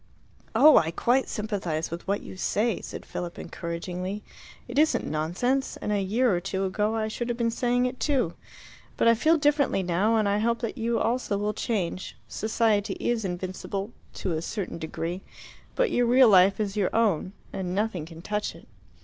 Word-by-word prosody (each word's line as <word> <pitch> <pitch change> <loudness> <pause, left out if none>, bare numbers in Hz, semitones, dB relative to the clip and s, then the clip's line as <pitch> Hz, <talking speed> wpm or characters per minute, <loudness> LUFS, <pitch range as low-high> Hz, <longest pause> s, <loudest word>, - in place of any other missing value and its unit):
"Oh, 305 +1 +8
I 160 - +3
quite 245 +10 +1
sympathize 190 -8 -2
with 170 +3 -6
what 200 +1 0
you - - -9
say," 215 +3 0
said - - -8
Philip 175 -1 -5
encouragingly; 180 +4 -5 0.4
"it 280 - -1
isn't 310 +1 +3
nonsense, 180 - -1
and 210 - -3
a 205 -1 +1
year 215 +2 +2
or - - 0
two 195 +1 -2
ago 210 +3 0
I 220 -1 0
should 235 +2 -4
have 240 - -1
been 230 -1 +1
saying 245 +1 +1
it 250 0 -3
too. 255 - +1 0.6
But - - +3
I 230 - +8
feel 315 +8 +3
differently 290 -9 +2
now, 185 +6 +2
and 215 -2 +2
I 200 +1 +2
hope 235 +2 +1
that 230 - -3
you 230 -1 0
also 230 -2 0
will 210 +1 -1
change. 190 -6 -3
Society 215 -2 +1
is 240 -2 0
invincible 190 +3 -4 0.2
to 185 - -3
a 160 -1 -1
certain 190 -1 -4
degree. 165 +3 -4 0.5
But - - +2
your 245 -1 +2
real 250 0 +7
life 195 0 +6
is 205 -2 -1
your 200 -3 +1
own, 200 -5 +1 0.2
and 185 -1 -3
nothing 195 -6 -1
can 165 0 -11
touch 210 +1 -2
it. - - -15
210 Hz, 185 wpm, -27 LUFS, 185-235 Hz, 0.6 s, Oh